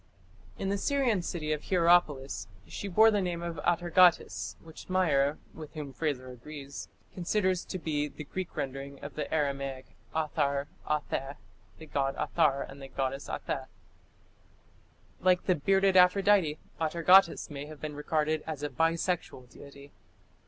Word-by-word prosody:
In 195 Hz, -, -2 dB
the 200 Hz, 0 st, 0 dB
Syrian 255 Hz, -6 st, +1 dB
city 155 Hz, -3 st, -2 dB
of 150 Hz, -, -5 dB
Hierapolis 160 Hz, -, +2 dB, 0.2 s
she 90 Hz, -, -6 dB
bore 220 Hz, +4 st, +6 dB
the 205 Hz, -2 st, +1 dB
name 175 Hz, -2 st, -2 dB
of 170 Hz, -1 st, -4 dB
Atargatis, 175 Hz, 0 st, +3 dB
which 160 Hz, +2 st, -12 dB
Meyer, 150 Hz, -6 st, +2 dB, 0.2 s
with 155 Hz, 0 st, -10 dB
whom 145 Hz, -3 st, -6 dB
Frazer 130 Hz, -3 st, -2 dB
agrees, 140 Hz, +3 st, -9 dB, 0.2 s
considers 185 Hz, 0 st, 0 dB
to 185 Hz, -, -4 dB
be 150 Hz, -4 st, -1 dB
the 150 Hz, -, -9 dB
Greek 185 Hz, +5 st, -6 dB
rendering 135 Hz, +1 st, -4 dB
of 145 Hz, -, -6 dB
the 150 Hz, -, -4 dB
Aramaic 140 Hz, -3 st, -2 dB, 0.2 s
'Athar 145 Hz, -3 st, 0 dB, 0.2 s
'Atheh 145 Hz, -2 st, -2 dB, 0.4 s
the 160 Hz, -, -10 dB
god 135 Hz, -2 st, -1 dB
'Athar 145 Hz, -5 st, +1 dB
and 140 Hz, +1 st, -12 dB
the 135 Hz, -, -7 dB
goddess 135 Hz, +1 st, -3 dB
'Atheh. -, -, -3 dB, 1.5 s
Like 185 Hz, -1 st, +3 dB
the 185 Hz, -, +3 dB
"bearded 195 Hz, +4 st, +2 dB
Aphrodite", 185 Hz, -3 st, +5 dB, 0.2 s
Atargatis 170 Hz, +2 st, +4 dB
may 145 Hz, 0 st, -6 dB
have 155 Hz, -1 st, -10 dB
been 155 Hz, -1 st, -5 dB
regarded 155 Hz, +1 st, 0 dB
as 150 Hz, -2 st, -5 dB
a 145 Hz, -, -1 dB
bisexual 165 Hz, -3 st, -1 dB
deity. 140 Hz, 0 st, -13 dB
155 Hz, 145 wpm, -30 LUFS, 140-180 Hz, 1.5 s, bore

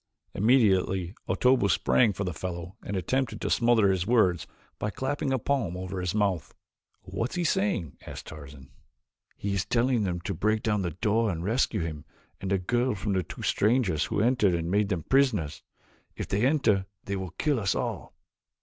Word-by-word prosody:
Immediately 95 Hz, -6 st, +2 dB, 0.2 s
Otobu 125 Hz, -5 st, +3 dB
sprang 115 Hz, +2 st, +3 dB
for 100 Hz, +1 st, -4 dB
the 90 Hz, -2 st, -3 dB
fellow 85 Hz, +2 st, -6 dB
and 100 Hz, -, -4 dB
attempted 120 Hz, +3 st, -1 dB
to -, -, -2 dB
smother 115 Hz, -4 st, +4 dB
his 95 Hz, 0 st, -1 dB
words 95 Hz, -8 st, +3 dB, 0.3 s
by 105 Hz, -, -1 dB
clapping 135 Hz, +4 st, -2 dB
a 130 Hz, -, +2 dB
palm 115 Hz, -8 st, -1 dB
over 95 Hz, 0 st, -4 dB
his 90 Hz, +2 st, -2 dB
mouth. 100 Hz, -7 st, 0 dB, 0.5 s
"What 100 Hz, +6 st, -3 dB
is -, -, -8 dB
he 175 Hz, -, 0 dB
saying?" 180 Hz, -, 0 dB
asked -, -, -8 dB
Tarzan. 70 Hz, -3 st, -11 dB, 0.7 s
"He 100 Hz, 0 st, -2 dB
is 100 Hz, -1 st, 0 dB
telling 120 Hz, +1 st, +1 dB
them 90 Hz, -4 st, -1 dB
to 100 Hz, -, -3 dB
break 110 Hz, +5 st, 0 dB
down 105 Hz, -2 st, +1 dB
the 90 Hz, -, -1 dB
door 110 Hz, +6 st, +1 dB
and 85 Hz, -3 st, -3 dB
rescue 115 Hz, +2 st, +1 dB
him 80 Hz, -3 st, -4 dB, 0.4 s
and 95 Hz, -, -4 dB
the 100 Hz, -, +2 dB
girl 120 Hz, +6 st, 0 dB
from 100 Hz, +1 st, -2 dB
two -, -, -9 dB
strangers 105 Hz, -, +2 dB
who -, -, -1 dB
entered 110 Hz, -6 st, +3 dB
and 85 Hz, 0 st, -2 dB
made 100 Hz, 0 st, +2 dB
them 90 Hz, -6 st, -1 dB
prisoners. 125 Hz, -, +1 dB, 0.5 s
If -, -, -5 dB
they 105 Hz, +6 st, +2 dB
enter 110 Hz, -10 st, +2 dB, 0.2 s
they 100 Hz, -, -3 dB
will 95 Hz, -3 st, -5 dB
kill 150 Hz, -5 st, +1 dB
us 100 Hz, -3 st, 0 dB
all." -, -, -4 dB
100 Hz, 185 wpm, -27 LUFS, 90-120 Hz, 0.7 s, smother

